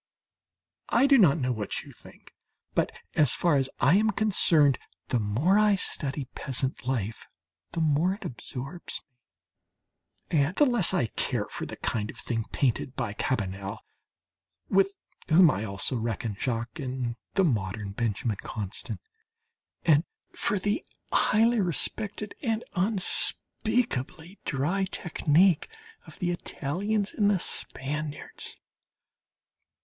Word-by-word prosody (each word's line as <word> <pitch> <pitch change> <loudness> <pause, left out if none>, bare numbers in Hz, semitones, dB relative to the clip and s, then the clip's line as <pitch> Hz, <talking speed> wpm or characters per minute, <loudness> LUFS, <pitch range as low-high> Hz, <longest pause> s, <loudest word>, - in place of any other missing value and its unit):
...I - - +4
do 275 -2 +6
not 165 -7 +6
know 130 -4 0
what 110 -4 -3
you - - -13
think, - - -17 0.4
but - - +1 0.2
as 150 -4 +4
far 170 -5 +2
as 135 -1 0
I 145 +9 +5
am 220 +1 +3
concerned, 170 -10 +4 0.3
the 125 - +2
more 130 - +2
I 210 -1 +5
study 140 -6 -2
peasant 130 -1 -2
life, 115 -4 -2 0.5
the 165 - -1
more 160 +5 +2
it - - -11
absorbs 135 +7 -6 1.3
me, 160 - +3
and 145 +6 +1
the 295 - +5
less 240 - +3
I - - +2
care - - -1
for - - -5
the - - -7
kind 110 -2 -2
of - - -9
thing 115 -3 -2
painted 130 0 0
by 120 -6 -2
Cabanel 100 -3 -2 0.9
(with 195 +1 +3 0.3
whom 165 0 +7
I 105 -3 -3
also 100 +5 0
reckon 115 -1 -2
Jacques 115 +5 -3
and 130 -3 -3 0.2
the 195 - +4
modern 105 - -1
Benjamin 110 0 -1
Constant) 100 -2 -5 0.9
and 155 -1 +5 0.3
for 205 - 0
the 205 +2 -1 0.3
highly 225 +1 +4
respected 205 +4 -1
and 225 -3 -1
unspeakably 190 - +1
dry 165 +8 0
technique 175 -1 +2 0.4
of - - -12
the 175 -2 -1
Italians 195 +6 -2
and 205 -2 +3
the 205 - +3
Spaniards. 150 0 -1
150 Hz, 130 wpm, -28 LUFS, 120-195 Hz, 1.3 s, whom